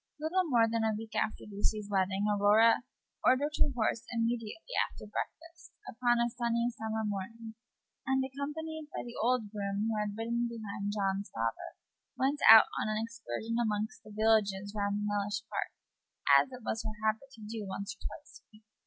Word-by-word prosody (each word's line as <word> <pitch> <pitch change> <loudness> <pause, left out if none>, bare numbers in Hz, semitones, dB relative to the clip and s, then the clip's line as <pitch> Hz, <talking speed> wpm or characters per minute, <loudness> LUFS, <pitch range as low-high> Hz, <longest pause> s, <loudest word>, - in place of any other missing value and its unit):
Little 355 +5 +1
more 235 -4 +5
than 225 0 0
a 220 -1 +1
week 220 0 -8
after 215 - -1
Lucy's 210 0 -2
wedding 195 0 +1
Aurora 210 +3 +5 0.4
ordered 285 +4 +3
her - - +5
horse 230 -3 0
immediately 230 - -2 0.2
after - - -11
breakfast, 335 +10 -7
upon 240 0 +2
a 235 0 +3
sunny 235 0 0
summer 220 -1 -3
morning, 220 +3 -5 0.5
and, 265 0 +2
accompanied 300 +3 -5
by - - -5
the 240 - -8
old 235 -3 +1
groom 200 0 -2
who - - -1
had 205 0 -3
ridden 235 +1 0
behind 205 -3 -4
John's 195 0 -1
father, 115 0 -3 0.4
went 275 +3 +1
out 220 0 +11 0.2
on - - -1
an 215 - 0
excursion 230 - -4
among 215 -1 0
the 215 - -13
villages 205 -2 +2
round 205 0 0
Mellish 205 0 -1
Park, - - -2 0.7
as 265 - +5
it 250 -2 -9
was 220 - -1
her 215 -2 -5
habit 220 +5 0
to 220 - -11
do 215 -1 -5
once 200 +2 -4
or - - -25
twice 295 - -9
a - - -47
week. 215 0 -19
220 Hz, 175 wpm, -32 LUFS, 205-240 Hz, 0.7 s, out